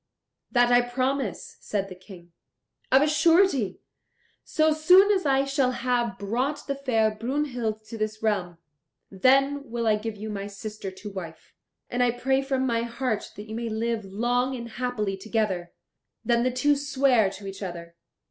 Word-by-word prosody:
"That 245 Hz, -1 st, +3 dB
I 245 Hz, 0 st, +6 dB
promise," 255 Hz, -2 st, -2 dB
said 200 Hz, -2 st, -2 dB
the 190 Hz, -, -8 dB
King. 180 Hz, -2 st, -14 dB, 0.6 s
"Of 265 Hz, +2 st, +6 dB
a -, -, +2 dB
surety, 305 Hz, -, +3 dB, 0.6 s
so 310 Hz, 0 st, +2 dB
soon 365 Hz, +6 st, +6 dB
as 375 Hz, -6 st, +1 dB
I 270 Hz, 0 st, +3 dB
shall 275 Hz, -2 st, +1 dB
have 240 Hz, -5 st, -1 dB
brought 250 Hz, +9 st, -2 dB
the 280 Hz, -, -1 dB
fair 240 Hz, -6 st, +1 dB
Brunhild 235 Hz, -2 st, -3 dB
to 225 Hz, 0 st, -8 dB
this 215 Hz, 0 st, -3 dB
realm, 185 Hz, -6 st, 0 dB, 0.5 s
then 275 Hz, +6 st, +2 dB
will 235 Hz, 0 st, -2 dB
I 215 Hz, -1 st, +3 dB
give 215 Hz, 0 st, -5 dB
you 215 Hz, +1 st, -6 dB
my 200 Hz, -1 st, -4 dB
sister 205 Hz, 0 st, -7 dB
to 195 Hz, +2 st, -9 dB
wife; 170 Hz, -4 st, -9 dB, 0.3 s
and 245 Hz, -, -2 dB
I 245 Hz, -, +4 dB
pray 265 Hz, +3 st, +1 dB
from 265 Hz, -1 st, -1 dB
my 230 Hz, -2 st, +1 dB
heart 235 Hz, -2 st, -3 dB
that 210 Hz, +1 st, -9 dB
you 220 Hz, -, -7 dB
may 230 Hz, +1 st, -3 dB
live 225 Hz, 0 st, -1 dB
long 240 Hz, +6 st, 0 dB
and 235 Hz, -1 st, -7 dB
happily 220 Hz, -5 st, -2 dB
together." 195 Hz, -4 st, -2 dB, 0.5 s
Then 235 Hz, -1 st, +3 dB
the 255 Hz, -, +2 dB
two 255 Hz, +4 st, +2 dB
sware 275 Hz, -6 st, +2 dB
to 195 Hz, +1 st, -10 dB
each 195 Hz, +1 st, -7 dB
other. 170 Hz, -3 st, -7 dB
235 Hz, 170 wpm, -26 LUFS, 210-265 Hz, 0.6 s, I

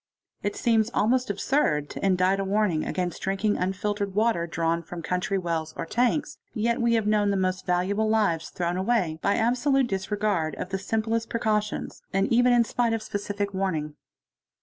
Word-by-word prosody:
It 205 Hz, -, -2 dB
seems 225 Hz, -2 st, +2 dB
almost 250 Hz, +4 st, +2 dB
absurd 155 Hz, -, +1 dB
to -, -, -7 dB
indite 190 Hz, 0 st, +3 dB
a -, -, 0 dB
warning 195 Hz, -5 st, +1 dB
against 180 Hz, -2 st, -3 dB
drinking 195 Hz, +2 st, 0 dB
P -, -, -5 dB
infiltered 200 Hz, +2 st, -1 dB
water 210 Hz, -6 st, +2 dB
drawn 165 Hz, 0 st, 0 dB
from 170 Hz, 0 st, -8 dB
country 180 Hz, +3 st, -1 dB
wells 165 Hz, -3 st, -3 dB
or -, -, -3 dB
tanks, 250 Hz, -, 0 dB, 0.2 s
yet 235 Hz, +3 st, 0 dB
we 235 Hz, 0 st, +3 dB
have 225 Hz, -2 st, +1 dB
known; 210 Hz, -1 st, +2 dB
he 200 Hz, -, +1 dB
most 185 Hz, 0 st, -1 dB
valuable 195 Hz, +5 st, +1 dB
lives 200 Hz, -7 st, +1 dB
thrown 175 Hz, 0 st, -2 dB
away 185 Hz, -6 st, 0 dB
by 200 Hz, -, +2 dB
absolute 250 Hz, +4 st, +2 dB
disregard 195 Hz, -5 st, -1 dB
of 185 Hz, -, -5 dB
the 195 Hz, 0 st, -2 dB
simplest 225 Hz, +3 st, -1 dB
mecautions, 215 Hz, -3 st, -1 dB
and 195 Hz, +3 st, +1 dB
even 245 Hz, +1 st, +5 dB
in 240 Hz, -1 st, +5 dB
spite 235 Hz, 0 st, 0 dB
of 225 Hz, -1 st, -2 dB
specific 205 Hz, -1 st, -3 dB
warning. 165 Hz, -6 st, -2 dB
200 Hz, 175 wpm, -26 LUFS, 180-225 Hz, 0.2 s, even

